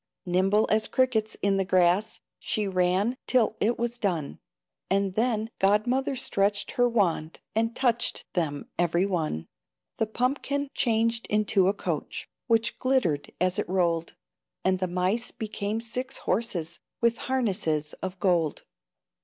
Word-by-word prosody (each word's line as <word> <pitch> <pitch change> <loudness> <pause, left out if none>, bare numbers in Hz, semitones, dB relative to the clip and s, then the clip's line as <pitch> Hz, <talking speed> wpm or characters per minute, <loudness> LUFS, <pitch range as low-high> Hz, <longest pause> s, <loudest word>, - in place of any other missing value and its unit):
Nimble 190 +4 +3
as 215 0 +3
crickets 235 -4 +1
in 200 -1 +3
the 195 - +2
grass 185 +3 +2 0.2
She 210 -2 0
ran, 190 +6 +1
till 240 -4 +3
it 235 +3 +1
was 240 0 -2
done, 175 -9 -2 0.5
And 195 0 +1
then 225 0 0
God 205 +2 +3
mother 265 +3 0
stretched 205 -4 +1
her 245 0 +2
wand 175 -8 0
And 225 +1 0
touched 240 -3 0
them 150 -5 -1
every 175 +1 +2
one. 160 - -1 0.5
The 225 - +1
pumpkin 275 +4 -1
changed 230 -1 +1
into 205 -2 +3
a 195 - +3
coach, - - -3 0.2
Which 230 -1 +1
glittered 185 - +1
as 185 +1 +1
it - - -2
rolled, 170 -3 0 0.5
And 185 0 +2
the 185 - 0
mice 185 +7 0
became 215 -1 -3
six 250 +3 -4
horses, 175 -8 -1 0.2
With 235 0 +2
harnesses 190 - 0
of 185 0 -5
gold. 175 -5 +1
205 Hz, 140 wpm, -27 LUFS, 180-230 Hz, 0.5 s, Nimble